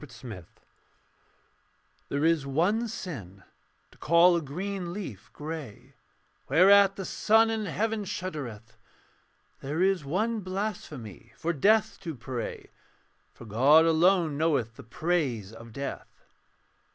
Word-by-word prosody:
ECCLESIASTES 115 Hz, -, -10 dB, 1.6 s
There 145 Hz, +2 st, 0 dB
is 165 Hz, -3 st, +3 dB
one 190 Hz, -, +1 dB
sin: 115 Hz, -, -7 dB, 0.5 s
to -, -, -22 dB
call 170 Hz, +2 st, +5 dB
a 170 Hz, -, 0 dB
green 180 Hz, +4 st, -5 dB
leaf 115 Hz, -, -7 dB
grey, 150 Hz, -7 st, -8 dB, 0.6 s
Whereat 195 Hz, +2 st, +6 dB
the 195 Hz, -, -5 dB
sun 225 Hz, +3 st, +3 dB
in 220 Hz, -1 st, -2 dB
heaven 215 Hz, +4 st, -1 dB
shuddereth. 130 Hz, -, -6 dB, 0.8 s
There 150 Hz, +6 st, -1 dB
is 190 Hz, -3 st, +2 dB
one 215 Hz, +10 st, -1 dB
blasphemy: 185 Hz, -, -6 dB
for 170 Hz, +1 st, -1 dB
death 210 Hz, +9 st, +2 dB
to 165 Hz, -5 st, -6 dB
pray, 120 Hz, -2 st, -6 dB, 0.6 s
For -, -, -12 dB
God 135 Hz, +9 st, +5 dB
alone 165 Hz, -2 st, +3 dB
knoweth 135 Hz, -9 st, 0 dB
the -, -, -11 dB
praise 125 Hz, -, -2 dB
of 115 Hz, 0 st, -12 dB
death. 140 Hz, +4 st, -6 dB
160 Hz, 115 wpm, -28 LUFS, 125-190 Hz, 1.6 s, Whereat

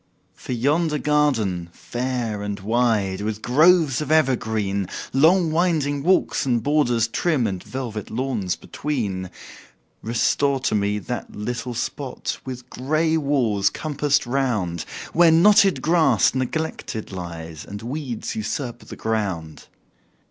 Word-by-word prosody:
For -, -, -6 dB
yonder 150 Hz, +6 st, +1 dB
garden, 115 Hz, -, +1 dB
fair 120 Hz, -4 st, -3 dB
and 105 Hz, 0 st, -4 dB
wide, 105 Hz, -3 st, +1 dB
With 110 Hz, +1 st, -3 dB
groves 155 Hz, 0 st, +4 dB
of 150 Hz, -, -3 dB
evergreen, 110 Hz, -, +1 dB, 0.3 s
Long 165 Hz, +5 st, +4 dB
winding 155 Hz, -4 st, +1 dB
walks, 175 Hz, -1 st, +2 dB
and 120 Hz, -5 st, 0 dB
borders 120 Hz, -6 st, +2 dB
trim, 140 Hz, +1 st, 0 dB
And 95 Hz, -4 st, -3 dB
velvet 120 Hz, -5 st, -5 dB
lawns 115 Hz, -6 st, -2 dB
between; 100 Hz, -11 st, -3 dB, 0.7 s
Restore 135 Hz, +4 st, +1 dB
to 130 Hz, -, 0 dB
me 105 Hz, 0 st, +1 dB
that 120 Hz, +3 st, -5 dB
little 120 Hz, +3 st, -4 dB
spot, 130 Hz, +3 st, -4 dB
With 125 Hz, -2 st, -7 dB
gray 155 Hz, +5 st, 0 dB
walls 125 Hz, -10 st, +2 dB
compassed 145 Hz, -1 st, 0 dB
round, 120 Hz, -10 st, -1 dB, 0.3 s
Where 170 Hz, 0 st, +6 dB
knotted 195 Hz, +4 st, +5 dB
grass 155 Hz, -, +4 dB
neglected 130 Hz, -4 st, -3 dB
lies, 85 Hz, -4 st, -7 dB
And 100 Hz, +2 st, -8 dB
weeds 130 Hz, -1 st, -4 dB
usurp 120 Hz, +3 st, -3 dB
the -, -, -10 dB
ground. 95 Hz, -9 st, -3 dB
125 Hz, 120 wpm, -23 LUFS, 105-150 Hz, 0.7 s, Where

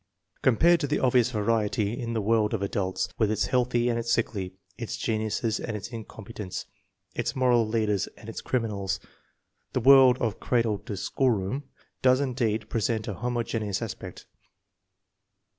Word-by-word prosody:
Compared 165 Hz, +8 st, +4 dB
to 145 Hz, -, -1 dB
the 150 Hz, -, +1 dB
obvious 125 Hz, -2 st, +3 dB
variety 110 Hz, -1 st, 0 dB
of 115 Hz, -1 st, -3 dB
the 110 Hz, -, +1 dB
world 110 Hz, 0 st, +2 dB
of 100 Hz, -, -3 dB
adults, 95 Hz, -2 st, -1 dB
with 110 Hz, -3 st, +3 dB
its 105 Hz, -2 st, +1 dB
healthy 120 Hz, +2 st, +1 dB
and 120 Hz, -1 st, +1 dB
its 115 Hz, 0 st, -2 dB
sickly, 100 Hz, -5 st, -1 dB, 0.2 s
its 115 Hz, -, -5 dB
geniuses 110 Hz, 0 st, -1 dB
and 110 Hz, -2 st, -3 dB
its 105 Hz, +2 st, -7 dB
incompetents, 110 Hz, -4 st, -7 dB, 0.5 s
its -, -, -2 dB
moral 125 Hz, -3 st, +3 dB
leaders 110 Hz, -3 st, 0 dB
and -, -, -13 dB
its -, -, -6 dB
criminals, 105 Hz, -6 st, -1 dB, 0.7 s
the -, -, +1 dB
world 130 Hz, 0 st, +7 dB
of 115 Hz, -6 st, -2 dB
cradle 115 Hz, -4 st, +1 dB
or 105 Hz, -, -2 dB
schoolroom 125 Hz, +3 st, 0 dB, 0.4 s
does 130 Hz, 0 st, +5 dB
indeed 120 Hz, -6 st, -1 dB
present 110 Hz, 0 st, -1 dB
a 105 Hz, -, -2 dB
homogeneous 115 Hz, -1 st, -2 dB
aspect. -, -, -7 dB
115 Hz, 150 wpm, -27 LUFS, 105-125 Hz, 0.7 s, world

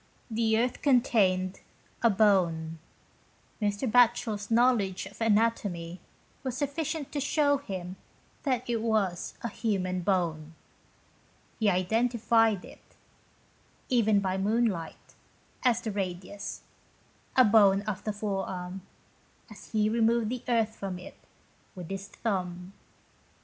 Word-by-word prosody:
The 220 Hz, 0 st, +2 dB
earth 245 Hz, +2 st, 0 dB
contained 200 Hz, -9 st, +2 dB, 0.4 s
a 235 Hz, -, +5 dB
bone. 175 Hz, -6 st, +2 dB, 0.8 s
Mr. 205 Hz, +4 st, 0 dB
Batchel's 235 Hz, -3 st, +3 dB
know 240 Hz, +3 st, +5 dB
ledge 195 Hz, -5 st, -2 dB
of 200 Hz, +4 st, -12 dB
anatomy 205 Hz, -6 st, 0 dB, 0.4 s
was 260 Hz, -3 st, -4 dB
sufficient 290 Hz, +1 st, -3 dB
to 290 Hz, -, -2 dB
show 285 Hz, 0 st, +2 dB
him 185 Hz, -7 st, -6 dB, 0.4 s
that 255 Hz, -4 st, -1 dB
it 235 Hz, -2 st, -1 dB
was 210 Hz, -6 st, 0 dB
a -, -, 0 dB
human 185 Hz, -5 st, -1 dB
bone. 165 Hz, -4 st, -1 dB, 1.0 s
He 215 Hz, -2 st, +3 dB
identified 225 Hz, +2 st, +2 dB
it, -, -, -17 dB, 0.9 s
even 220 Hz, -5 st, +3 dB
by 190 Hz, -1 st, -1 dB
moonlight, 210 Hz, -4 st, -1 dB, 0.5 s
as 245 Hz, -3 st, +2 dB
the 220 Hz, -, -3 dB
radius, 195 Hz, 0 st, -5 dB, 0.7 s
a 255 Hz, -, +8 dB
bone 200 Hz, -2 st, +5 dB
of 205 Hz, -2 st, -4 dB
the 215 Hz, -, -1 dB
forearm, 195 Hz, -3 st, -4 dB, 0.7 s
as 205 Hz, -, -12 dB
he 215 Hz, -1 st, +2 dB
removed 230 Hz, 0 st, +2 dB
the 250 Hz, 0 st, -3 dB
earth 225 Hz, -2 st, +1 dB
from 190 Hz, -2 st, -5 dB
it, 180 Hz, -, -12 dB, 0.6 s
with 180 Hz, -1 st, -8 dB
his 195 Hz, 0 st, -5 dB
thumb. 180 Hz, -3 st, -4 dB
210 Hz, 120 wpm, -29 LUFS, 185-235 Hz, 1.0 s, a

